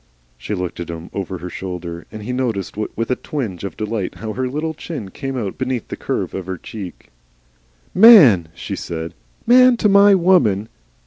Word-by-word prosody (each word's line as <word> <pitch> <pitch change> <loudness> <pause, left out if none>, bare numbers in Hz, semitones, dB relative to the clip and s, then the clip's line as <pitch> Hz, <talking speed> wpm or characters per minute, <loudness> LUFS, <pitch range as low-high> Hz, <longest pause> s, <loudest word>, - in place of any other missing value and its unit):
She - - -5
looked 90 -2 -5
at 85 - -6
him 85 0 -8
over 95 -1 -4
her 90 +1 -7
shoulder, 85 -2 -6
and 110 -1 -8
he 125 +4 -4
noticed 115 -7 -2
with 110 +3 -3
a - - +2
twinge 115 - -5
of 100 - -6
delight 105 -3 -3
how 110 -1 -6
her 130 +2 -2
little 155 +4 -3
chin 145 - -7
came 135 +2 -5
out 105 -6 -4
beneath 130 -3 -3
the - - -4
curve - - -3
of 95 -2 -6
her 95 -1 -4
cheek. 95 0 -9 0.8
"MAN!" 170 - +8
she - - -5
said. 80 0 -6 0.3
"Man 250 0 +6
to 215 - +2
MY 200 0 +6
woman! 125 - +3
110 Hz, 185 wpm, -19 LUFS, 90-140 Hz, 0.8 s, MAN